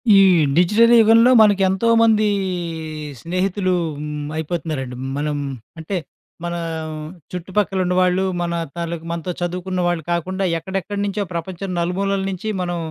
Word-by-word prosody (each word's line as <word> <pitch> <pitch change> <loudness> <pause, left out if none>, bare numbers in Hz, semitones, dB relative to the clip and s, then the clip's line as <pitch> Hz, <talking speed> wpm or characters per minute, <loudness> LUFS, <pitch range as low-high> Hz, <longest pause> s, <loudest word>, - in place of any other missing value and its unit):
ఈ - - +8 0.4
డిజిటల్ 215 +7 +5
యుగంలో 225 +2 +6
మనకెంతోమంది 215 +2 +4 1.0
స్నేహితులు 185 +2 0 0.3
హ్మ్. 150 0 -5
అయిపోతన్నారండి. 155 -5 -3 0.2
మనం 150 0 -1 0.4
అంటే, 175 +4 -3 0.5
మన 175 0 -3 0.8
చుట్టుపక్కలున్నవాాళ్ళు, 185 0 +1 0.2
మన 170 0 -1 0.2
తల 170 0 -3
మనతో 170 +1 -3
చదువుకున్న 180 +1 -2
వాళ్ళు 175 -3 -1
కాకుండా, 185 +3 -1
ఎక్కడెక్కడ్నుంచో 200 +3 -3
ప్రపంచం 180 +3 -4
నలుమూలల 195 +3 0
నించి 195 +4 -3
మనం 175 -1 -2
185 Hz, 100 wpm, -20 LUFS, 170-200 Hz, 1.0 s, ఈ